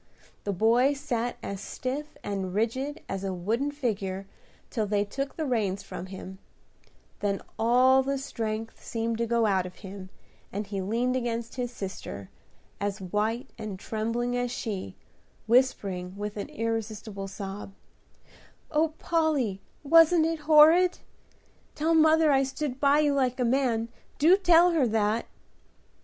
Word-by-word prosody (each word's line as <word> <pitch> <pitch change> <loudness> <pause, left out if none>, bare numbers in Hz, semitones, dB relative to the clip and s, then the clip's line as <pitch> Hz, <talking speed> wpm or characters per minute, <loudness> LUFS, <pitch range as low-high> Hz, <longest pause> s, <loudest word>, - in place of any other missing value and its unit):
The 205 - 0
boy 230 +8 +3
sat 245 -4 -2
as 200 0 -5
stiff 265 +8 -5
and 195 -2 -3
rigid 260 +7 -1
as 195 0 -4
a 195 - -2
wooden 225 +11 -1
figure 200 -9 -3 0.5
till 220 -4 -1
they 205 0 +1
took 275 +6 -4
the 315 - -2
reins 210 -7 0
from 185 - -7
him; 190 0 -9 0.8
then 200 -1 0 0.2
all 255 +4 +5
the 275 +1 -1
strength 225 -4 -4
seemed 230 0 -2
to 235 - 0
go 235 0 +2
out 190 -3 +2
of 180 - -12
him, 190 -1 -8 0.4
and 205 +2 -3
he 200 -1 -4
leaned 235 +6 0
against 235 -2 -2
his 245 -2 -3
sister, 190 - -7 0.5
as 200 0 -2
white 215 +7 -2
and 215 -3 -5
trembling 230 +4 -2
as 245 0 0
she, 205 - -4 0.5
whispering 200 -6 +1
with 210 0 -4
an 205 - -5
irrepressible 220 -3 -4
sob, 195 +1 -7 1.0
"O 315 +1 +1
Polly, 295 - 0 0.2
wasn't 330 +2 +6
it 325 0 -1
horrid? 325 +4 +7 0.8
Tell 315 +2 +1
mother 315 -1 +5
I 270 -1 +4
stood 270 0 -3
by 285 +1 +4
you 295 -1 +2
like 260 -2 +1
a 250 - +2
man. 235 -2 +1 0.3
Do 330 +6 +6
tell 350 -2 +5
her 305 -7 +3
that!" 220 0 0
230 Hz, 145 wpm, -27 LUFS, 205-275 Hz, 1.0 s, horrid